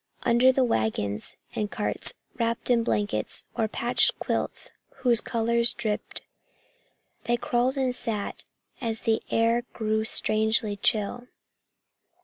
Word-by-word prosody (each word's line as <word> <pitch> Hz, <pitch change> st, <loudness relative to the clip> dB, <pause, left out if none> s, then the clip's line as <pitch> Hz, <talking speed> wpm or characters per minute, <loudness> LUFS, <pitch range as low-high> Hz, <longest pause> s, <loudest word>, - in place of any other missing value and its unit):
Under 240 Hz, +2 st, +5 dB
the 260 Hz, 0 st, +2 dB
wagons 110 Hz, -, -1 dB, 0.2 s
and 210 Hz, -1 st, -2 dB
carts, 210 Hz, -, -3 dB, 0.2 s
wrapped 230 Hz, +1 st, -1 dB
in 235 Hz, -1 st, +4 dB
blankets 205 Hz, -3 st, -1 dB
or 225 Hz, -, +1 dB
patched 235 Hz, +3 st, +3 dB
quilts -, -, -2 dB, 0.3 s
whose 235 Hz, -2 st, +6 dB
colors 235 Hz, 0 st, +1 dB
dripped, 220 Hz, -3 st, -3 dB, 1.0 s
they 240 Hz, 0 st, +2 dB
crawled 245 Hz, +3 st, 0 dB
and 260 Hz, -2 st, +1 dB
sat 215 Hz, -4 st, -2 dB, 0.4 s
as 225 Hz, -2 st, -2 dB
the 225 Hz, -1 st, +1 dB
air 230 Hz, +1 st, +3 dB
grew 220 Hz, -1 st, 0 dB
strangely 220 Hz, 0 st, +2 dB
chill. 220 Hz, +4 st, 0 dB
230 Hz, 120 wpm, -27 LUFS, 215-240 Hz, 1.0 s, whose